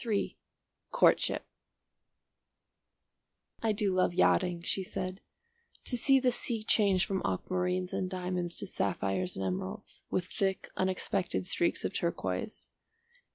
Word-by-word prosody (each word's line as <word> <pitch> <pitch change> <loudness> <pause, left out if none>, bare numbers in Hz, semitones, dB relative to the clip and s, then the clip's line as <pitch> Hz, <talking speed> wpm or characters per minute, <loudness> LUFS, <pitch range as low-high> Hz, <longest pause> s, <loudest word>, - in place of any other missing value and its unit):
III 215 -4 -1 0.6
COURTSHIP - - +3 2.2
"I 225 - +2
do 205 -2 +1
love 185 -1 +2
yachting," 180 -2 +3
she 195 - +1
said, 185 +1 -4 0.6
"to 250 - 0
see 270 +3 +5
the 255 -1 +3
sea 235 -2 -2
change 200 -4 +3
from 190 -1 -1
aquamarines 180 - -1
and 185 - -1
diamonds 180 -2 -2
to - - -2
sapphires 95 - -1
and 95 - -2
emeralds, 95 0 -4
with 180 - 0
thick 190 0 -2
unexpected 190 0 0
streaks 340 - +1
of - - -2
turquoise. - - -2
185 Hz, 120 wpm, -31 LUFS, 180-205 Hz, 2.2 s, see